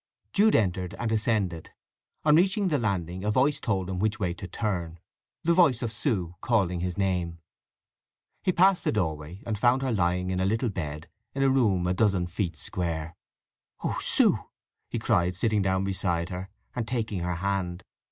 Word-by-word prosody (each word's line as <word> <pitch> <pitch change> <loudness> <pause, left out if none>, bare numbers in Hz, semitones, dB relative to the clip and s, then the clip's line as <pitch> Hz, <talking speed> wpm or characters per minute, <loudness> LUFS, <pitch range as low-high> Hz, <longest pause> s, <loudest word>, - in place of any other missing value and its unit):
Jude 210 +2 +5
entered 95 -3 0
and 115 -2 -2
ascended. 105 -7 0 0.6
On 150 -1 +6
reaching 190 +3 +3
the 150 -4 +1
landing 95 -4 -2
a 105 - 0
voice 140 +6 +2
told 95 -6 -1
him 95 -1 -3
which 110 +3 0
way 90 -4 0
to 90 +2 -8
turn—the 90 - -3
voice 155 -9 +4
of 115 - -2
Sue 100 - -1
calling 95 -7 +1
his 90 0 -3
name. 90 -4 0 1.0
He 185 - +2
passed 185 +1 +4
the - - +1
doorway, 80 -2 -3
and 110 -3 -2
found 125 +3 +3
her 130 - 0
lying 90 -2 +1
in 95 - -1
a 95 - +1
little 115 +5 +1
bed 80 -4 -5 0.3
in 135 - +1
a 135 - +5
room 105 -9 +2
a 90 - +1
dozen 100 -3 +2
feet 90 -2 -3
square. 80 +1 -3 0.7
"Oh, - - -1
Sue!" - - +4 0.5
he - - -2
cried, 90 +1 +1
sitting 105 +1 +1
down 95 0 +1
beside 90 -3 -1
her 95 +1 -5 0.3
and 115 -3 -2
taking 110 -5 -2
her 90 0 -2
hand. 90 0 -2
95 Hz, 175 wpm, -27 LUFS, 90-115 Hz, 1.0 s, On